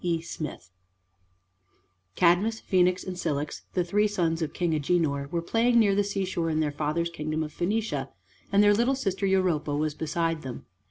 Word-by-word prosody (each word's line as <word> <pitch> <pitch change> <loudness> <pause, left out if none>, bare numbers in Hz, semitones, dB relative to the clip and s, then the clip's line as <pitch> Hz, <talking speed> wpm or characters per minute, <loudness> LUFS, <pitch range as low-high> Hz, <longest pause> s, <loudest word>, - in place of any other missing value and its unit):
E. 170 -2 +1
SMITH 155 - -7 1.4
Cadmus, 190 +6 +3
Phoenix, 180 -1 +2
and 185 - -5
Cilix, 150 -4 -3
the 180 - +2
three 205 +5 +2
sons 170 -5 0
of 155 - -2
King 175 -2 -1
Agenor, 145 -2 0
were 170 -1 -1
playing 235 +6 +2
near 210 -4 +5
the 205 +1 +2
seashore 190 -4 -2
in 155 -1 0
their 150 -2 +1
father's 155 +3 -1
kingdom 155 0 -2
of 150 - -7
Phoenicia, 215 +5 -1 0.4
and 200 +1 +5
their 205 0 +6
little 240 +6 +2
sister 195 -6 -1
Europa 180 -6 +1
was 155 0 0
beside 165 +1 -1
them. 130 -4 -7
175 Hz, 170 wpm, -27 LUFS, 155-195 Hz, 1.4 s, their